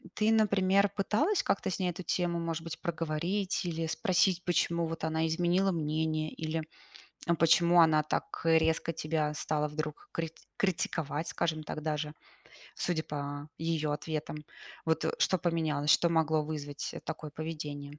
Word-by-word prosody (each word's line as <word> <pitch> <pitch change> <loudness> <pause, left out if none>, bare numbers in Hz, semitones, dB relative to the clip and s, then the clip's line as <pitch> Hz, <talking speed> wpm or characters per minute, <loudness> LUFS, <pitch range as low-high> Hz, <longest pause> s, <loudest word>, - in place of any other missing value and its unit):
ты, 215 +1 +3
например, 200 -2 +4
пыталась 295 - +2
как-то - - 0
с 185 - -2
ней 185 -2 0
эту 180 - -7
тему, 175 0 0
может 165 -1 -3
быть, 165 - -6
проговорить 170 +4 -1
или 165 -1 -2
спросить, 180 +1 +2
почему 170 -1 +1
вот 165 -1 -5
она 160 0 +1
изменила 175 +4 +2
мнение? 155 -1 -1
Или, 160 0 -3 0.6
э, 170 - +4
почему 170 +1 +5
она 155 -1 +5
так, 150 - -3
э, 165 0 +6
резко 160 +1 +1
тебя 155 -1 -1
стала 150 0 -1
вдруг 155 0 -5
крит 165 -1 -4 0.2
критиковать, 160 -4 -1
скажем 155 -2 -1
так, 155 - -5
даже, 150 -1 -2 0.6
судя 165 -3 -1
по 145 0 -5
ее 160 -2 0
ответам. 155 0 -4 0.5
Вот, 160 -1 +1
э, - - 0
что 185 - +3
поменялось, 160 -3 +1
что 170 - +5
могло 160 -2 +2
вызвать, 145 -2 -4
э, - - -6
такое 155 -1 -5
поведение? 150 -2 -6
160 Hz, 155 wpm, -31 LUFS, 155-175 Hz, 0.6 s, э